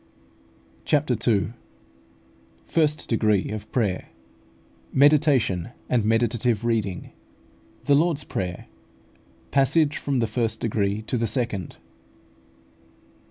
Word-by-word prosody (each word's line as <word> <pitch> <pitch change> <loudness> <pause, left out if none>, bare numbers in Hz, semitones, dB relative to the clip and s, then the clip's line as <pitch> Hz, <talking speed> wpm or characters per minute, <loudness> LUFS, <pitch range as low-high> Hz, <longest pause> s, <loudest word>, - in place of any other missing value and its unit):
CHAPTER - - +1 0.2
II. 105 +1 0 1.1
FIRST 150 -2 +1
DEGREE 105 -4 +1
OF 110 0 -7
PRAYER 105 -7 -1 0.8
MEDITATION 135 - +3 0.2
AND 120 -4 +2
MEDITATIVE 115 0 +1
READING 105 -6 -1 0.7
THE 145 - +4
LORD'S 155 0 +2
PRAYER 90 -7 -4 0.9
PASSAGE 145 +2 +3
FROM 140 -2 -1
THE 120 - +2
FIRST 110 0 -1
DEGREE 105 -1 -1
TO 120 +2 -2
THE 115 - 0
SECOND. 110 -6 -3
115 Hz, 95 wpm, -24 LUFS, 105-135 Hz, 1.1 s, THE